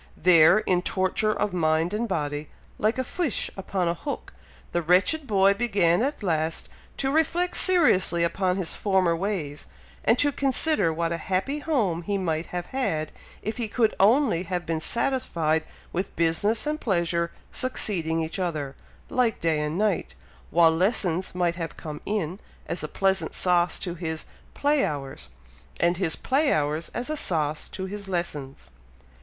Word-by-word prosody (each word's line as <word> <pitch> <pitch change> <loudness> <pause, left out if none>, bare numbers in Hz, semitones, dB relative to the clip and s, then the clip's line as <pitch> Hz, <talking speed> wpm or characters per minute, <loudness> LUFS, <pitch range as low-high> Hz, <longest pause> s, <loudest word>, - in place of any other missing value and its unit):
There, 165 +1 +6
in 185 -4 +1
torture 190 +4 0
of 210 -2 -1
mind 160 +1 +1
and 230 +3 -1
body, 150 -5 -3 0.3
like 215 +3 +1
a 260 - 0
fish 315 - -2
upon 190 -2 -2
a 170 - +2
hook, 280 - -6 0.4
the 175 - 0
wretched 190 - +2
boy 195 -2 +4
began 200 -5 +2
at 280 -1 -2
last 160 -3 -1 0.3
to 270 0 0
reflect 335 +4 +1
seriously 190 - +4
upon 180 +2 +1
his 180 -4 -1
former 190 -4 +2
ways, 165 -6 -3 0.4
and 230 - +4
to 290 +2 +3
consider 275 - +2
what 165 +1 -1
a 170 - -1
happy 190 - -1
home 225 - 0
he 200 +3 -1
might 165 -3 -2
have 175 0 -4
had, 165 -13 -2 0.3
if 220 +1 -3
he 235 -2 -2
could 220 0 +1
only 220 - +4
have 180 -1 -3
been 165 -1 -1
satisfied 165 - 0 0.3
with 185 +3 -3
business 170 - +1
and 305 +1 -2
pleasure 170 -4 0 0.2
succeeding 170 -10 0
each 160 +4 -4
other, 155 -7 -2 0.3
like 245 -4 +1
day 160 -2 +1
and 150 +2 -2
night, 205 -3 0 0.3
while 165 -1 +5
lessons 185 -1 +1
might 175 -1 0
have 165 -2 -5
come 150 -2 -7
in, 195 -3 -2 0.3
as 170 - -3
a - - -2
pleasant 195 +3 0
sauce 175 -1 +2
to 175 - -4
his 160 -2 -4 0.3
play 290 0 +2
hours, 135 - -4 0.5
and 175 +1 +2
his 175 -4 0
play 280 +3 +1
hours 150 +2 0
as 245 - -2
a - - 0
sauce 155 - -1
to 190 - -5
his 200 +1 -6
lessons. 145 - -4
180 Hz, 160 wpm, -26 LUFS, 165-215 Hz, 0.5 s, There